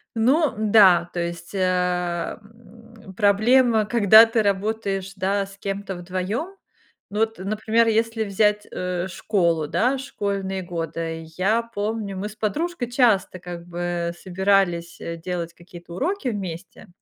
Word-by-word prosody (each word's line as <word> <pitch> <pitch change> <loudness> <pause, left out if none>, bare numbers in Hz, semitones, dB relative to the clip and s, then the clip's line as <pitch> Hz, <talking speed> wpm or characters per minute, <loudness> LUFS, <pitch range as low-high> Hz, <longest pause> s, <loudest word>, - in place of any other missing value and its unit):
Ну 270 +7 +3
да, 200 -5 +5
то 175 - -4
есть, 170 +2 -5
э, 180 -2 0
м, 225 -1 -16
проблема, 220 +2 +4
когда 220 0 +7
ты 225 -1 +1
работаешь, 200 -1 -1
да, 195 +1 0
с 195 - -14
кем-то 200 -1 -4
вдвоём. 185 - -4 0.5
Ну 210 - -4
вот, 225 0 0
например, 215 +4 +1
если 225 0 +1
взять, 210 +1 +1
э, 180 0 -3
школу, 170 -4 0
да, 255 - +1
школьные 200 -7 -3
годы, 165 -1 -4
я 215 +5 +2
помню, 215 -2 -4
мы 205 +3 -4
с 210 - -13
подружкой 250 - -2
часто 225 -7 +2
как 175 -1 -8
бы 175 0 -3
собирались, 185 -2 0
э, 170 0 -5
делать 170 0 -4
какие-то 175 -1 -13
уроки 325 - -2
вместе, 190 -4 -7
200 Hz, 135 wpm, -23 LUFS, 180-225 Hz, 0.5 s, когда